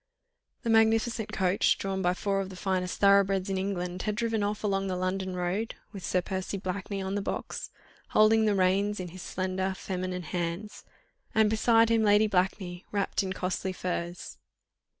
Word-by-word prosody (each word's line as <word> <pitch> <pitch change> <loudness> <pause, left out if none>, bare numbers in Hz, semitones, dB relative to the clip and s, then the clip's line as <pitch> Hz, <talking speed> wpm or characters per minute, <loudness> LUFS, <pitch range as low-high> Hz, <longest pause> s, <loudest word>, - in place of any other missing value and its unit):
The 230 - -2
magnificent 225 0 +3
coach, 185 0 +2
drawn 195 -1 -2
by 180 0 +2
four 195 0 0
of 190 - -5
the 190 - -9
finest 185 -1 -2
thoroughbreds 200 -1 +4
in 190 - 0
England, 180 -2 -3
had 210 -1 -1
driven 225 -1 0
off 205 +1 -2
along 195 -1 0
the 185 - -1
London 185 +1 -2
road, 180 +6 -2 0.2
with 195 -4 -8
Sir 180 0 0
Percy 190 +2 -3
Blakeney 195 +1 -4
on 190 0 -3
the 205 - 0
box, - - -4 0.4
holding 220 +1 +5
the 210 -1 +3
reins 195 +2 +2
in 180 -1 -4
his 185 +2 -10
slender 185 +1 -2
feminine 185 -1 -3
hands, 175 +5 -4 0.5
and 215 -1 +4
beside 225 +1 +4
him 230 -1 +3
Lady 210 0 +5
Blakeney 185 -2 -1
wrapped 200 -2 0
in 190 -1 -3
costly 185 0 -2
furs. 175 -1 -4
195 Hz, 170 wpm, -29 LUFS, 185-210 Hz, 0.5 s, holding